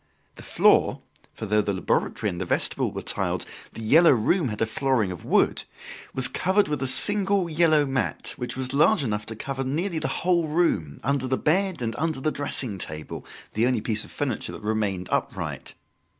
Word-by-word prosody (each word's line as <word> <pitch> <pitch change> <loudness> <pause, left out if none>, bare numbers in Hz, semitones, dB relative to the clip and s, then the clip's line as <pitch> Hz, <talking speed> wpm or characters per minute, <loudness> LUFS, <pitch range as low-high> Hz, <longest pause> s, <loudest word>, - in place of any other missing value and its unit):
The - - -12
floor - - +2 0.3
for 110 - -7
though 105 +1 +2
the 100 -1 -2
laboratory 95 - -1
and 85 - -6
the - - -2
vestibule - - 0
were - - -6
tiled, - - -1 0.3
"The 115 - -8
Yellow 160 +10 +6
Room" 135 - +1
had 105 -2 -5
a 115 - +2
flooring 115 -3 0
of 90 - -8
wood - - +2 0.5
was 130 -1 +3
covered 195 +2 +1
with 150 -3 -3
a 135 - 0
single 195 +7 +5
yellow 155 -2 +3
mat 135 -1 -2
which 125 0 -5
was 130 0 -3
large 155 +5 +4
enough 105 -3 -3
to 110 - -6
cover 135 +4 -4
nearly 160 +6 -2
the - - -2 0.2
whole 175 -3 +2
room, 150 - 0
under 135 0 0
the 130 0 0
bed 185 -2 0
and 115 -1 -3
under 155 -2 -1
the 155 +3 -1
dressing 130 -8 -1
table 75 -2 -7 0.3
the 115 +3 +2
only 125 -3 +1
piece 110 0 0
of - - -11
furniture 135 -6 -3
that - - -10
remained 105 -4 -2
upright. - - -3
130 Hz, 195 wpm, -25 LUFS, 110-160 Hz, 0.5 s, Yellow